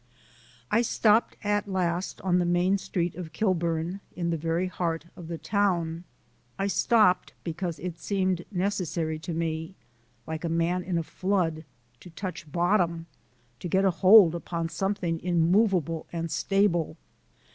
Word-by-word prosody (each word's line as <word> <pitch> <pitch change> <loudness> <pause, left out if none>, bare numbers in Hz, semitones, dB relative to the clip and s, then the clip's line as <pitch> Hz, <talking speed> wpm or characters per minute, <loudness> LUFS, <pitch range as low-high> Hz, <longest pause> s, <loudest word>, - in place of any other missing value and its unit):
I 230 - +4
stopped 225 -1 +2
at 205 0 0
last 180 -2 -2
on 180 -1 +2
the - - +2
main 175 +3 +2
street 175 -3 -2
of 160 -2 -8
Kilburn 170 -1 0 0.2
in 170 -1 -1
the - - +1
very 165 +3 -1
heart 170 -3 -2
of 175 - -10
the 170 0 -4
town. 175 -4 0 0.5
I 195 - -1
stopped 200 -1 +3
because 170 0 -3
it 175 +1 -6
seemed 185 -3 0
necessary 175 -5 -1
to 160 - -6
me, 160 +1 -3 0.5
like 160 +1 -5
a 170 - -1
man 170 +2 +1
in 180 -1 -2
a 165 - 0
flood, 170 -3 -1 0.3
to 180 - -12
touch 170 -2 -7
bottom, 170 -1 +1 0.5
to 175 - -5
get 190 +3 +2
hold 185 0 +7
upon 170 -1 -3
something 185 -3 -1
immovable 175 -1 +2
and 165 -1 -3
stable. 185 -5 +1
175 Hz, 145 wpm, -27 LUFS, 165-190 Hz, 0.5 s, hold